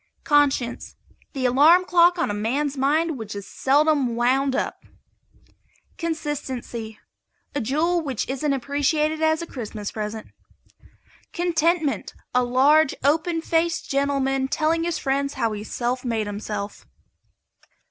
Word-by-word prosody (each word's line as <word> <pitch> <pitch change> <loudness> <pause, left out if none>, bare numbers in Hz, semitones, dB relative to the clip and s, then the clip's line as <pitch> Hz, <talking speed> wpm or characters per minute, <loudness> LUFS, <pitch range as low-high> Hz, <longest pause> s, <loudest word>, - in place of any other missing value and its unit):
CONSCIENCE. 285 -5 +1 0.4
The 265 -3 -2
alarm 305 +9 +5
clock 350 0 +4
on 335 - 0
a - - -2
man's 265 +8 -1
mind 295 +2 +1
which 215 -2 -6
is 200 -1 -6
seldom 280 -3 +2
wound 260 +3 +2
up. - - -3 1.2
CONSISTENCY. 265 -9 -4 0.6
A 285 - -1
jewel 320 +9 +1
which 270 -7 -3
isn't 275 +3 -1
appreciated 290 +4 0
as 315 +1 +2
a - - -5
Christmas 215 -8 -6
present. 215 0 -5 1.1
CONTENTMENT. 335 -3 0 0.2
A 250 0 +3
large, 270 +5 +4
open 320 +3 +1
faced 330 0 0
gentleman 275 -1 +1
telling 325 +3 0
his 340 -2 -1
friends 280 -1 -1
how 230 - 0
he 210 -1 -5
self 245 +3 -3
made 225 -4 -1
himself. 205 0 -6
275 Hz, 125 wpm, -23 LUFS, 245-315 Hz, 1.2 s, alarm